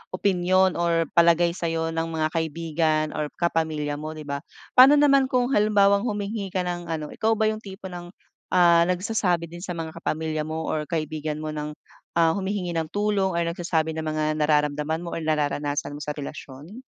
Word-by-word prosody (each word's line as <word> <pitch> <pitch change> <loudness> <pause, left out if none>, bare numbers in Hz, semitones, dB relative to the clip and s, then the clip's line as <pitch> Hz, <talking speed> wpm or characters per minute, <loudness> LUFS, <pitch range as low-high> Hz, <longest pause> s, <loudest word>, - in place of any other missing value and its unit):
opinyon 185 -1 +2
or 170 -1 +2
palagay 170 0 +4
sa'yo 165 -2 -2
ng 165 0 -2
mga 160 -1 0
kaibigan 160 -1 0
or 150 -1 -2
kapamilya 155 -4 -1
mo, 155 +1 -6
'di 155 - -8
ba? 140 -1 -4 0.3
Paano 265 +3 +8
naman 275 -2 +5
kung 250 0 +1
halimbawang 205 -1 +3
humingi 205 -1 -3
ka 185 -1 -2
ng 175 -1 -4
ano 155 -2 -4
ikaw 225 0 +1
ba 220 0 +2
yung 215 - -5
tipo 190 -2 -9
ng 175 0 -7 0.4
ah, 170 -1 +5
nagsasabi 180 -3 0
din 175 - -8
sa 180 -1 -5
mga 165 -1 -5
kapamilya 155 -1 -2
mo 160 +1 -3
or 150 -1 -2
kaibigan 155 -1 -3
mo 155 - -3
ng 150 0 -5 0.4
ah, 165 -1 +4
humihingi 190 -1 -2
ng 165 -2 -2
tulong 205 -1 0
or 170 - +1
nagsasabi 170 -1 -1
ng 160 - -4
mga 155 0 0
nararamdaman 150 +1 +1
mo 170 - -6
or - - -3
nararanasan 145 -2 -1
mo 145 - -7
sa 150 0 -4
relasyon? 145 - -9
165 Hz, 180 wpm, -25 LUFS, 155-190 Hz, 0.4 s, Paano